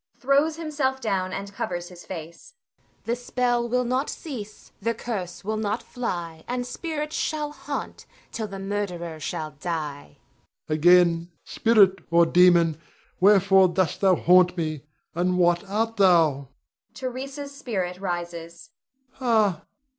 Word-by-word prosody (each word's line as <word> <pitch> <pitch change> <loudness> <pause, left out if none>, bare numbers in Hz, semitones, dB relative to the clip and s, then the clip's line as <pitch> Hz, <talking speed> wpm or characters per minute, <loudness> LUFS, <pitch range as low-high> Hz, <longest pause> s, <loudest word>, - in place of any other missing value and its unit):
[Throws 280 +4 +2
himself 295 -5 -2
down 190 -6 -1
and 200 +1 -6
covers 175 -2 -4
his 175 -1 -13
face. 170 - -9
Voice. - - -44 0.2
The 235 - 0
spell 245 -1 -1
will 250 +1 +1
not 255 +4 0
cease, 220 -10 -8
The 230 0 0
curse 200 -7 -5
will 215 +2 -2
not 215 +1 -2
fly, 170 -9 -5
And 245 0 -2
spirits 300 +3 -4
shall 300 -1 -2
haunt - - -6 0.2
Till 220 -2 -4
the 195 -1 -7
murderer 190 -5 -4
shall 155 0 -4
die. 150 - -5 0.5
Rod. - - -1
Again, 170 +1 +4
spirit 200 -4 +4
or 170 0 +5
demon, 170 -2 +4 0.4
wherefore 195 -1 +6
dost 180 -2 -1
thou 190 -2 +5
haunt 180 +1 +4
me, 155 -4 -2 0.3
and 180 +2 0
what 175 0 +3
art 225 +2 -1
thou? 165 -8 +4 0.5
[Theresa's 275 +2 -6
spirit 190 -10 -3
rises.] 175 0 -5 0.4
Ha! 220 - +1
195 Hz, 135 wpm, -25 LUFS, 175-240 Hz, 0.5 s, wherefore